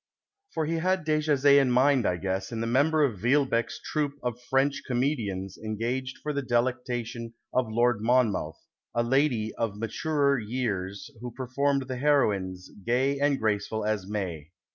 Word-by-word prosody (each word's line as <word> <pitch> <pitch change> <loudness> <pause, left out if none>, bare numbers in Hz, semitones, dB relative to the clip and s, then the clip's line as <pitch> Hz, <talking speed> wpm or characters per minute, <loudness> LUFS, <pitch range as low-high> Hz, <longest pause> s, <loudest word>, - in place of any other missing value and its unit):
For 160 - -2
he 165 +2 -1
had 185 0 0
Dejazet 145 -2 +4
in 135 - +2
mind, 130 0 +4
I 90 - 0
guess, 95 +2 -3
in 115 - -4
tiic 115 0 -1
member 150 +5 +3
of 115 -9 0
Villebccque's 130 +3 +1
troop 150 -2 -1
of 125 -1 -3
French 135 +2 +1
comedians 115 -8 -2
engaged 120 +5 -3
for 150 - -2
the 140 - -1
delectation 120 -2 -2 0.2
of 125 -3 +1
Lord 120 -1 +2
Monmouth, 110 -9 +1 0.2
" - - -37
a 120 - +2
lady 120 -3 +1
of 115 -3 -2
maturcr 140 +4 0
years 100 -5 -3
who 125 +1 -5
performed 135 +2 -1
the 130 -1 -4
heroines, 100 -10 +1
gay 130 +5 +1
and 140 -1 +2
graceful 110 0 -1
as 105 -3 -1
May." 90 -7 -4
125 Hz, 160 wpm, -27 LUFS, 110-140 Hz, 0.2 s, Dejazet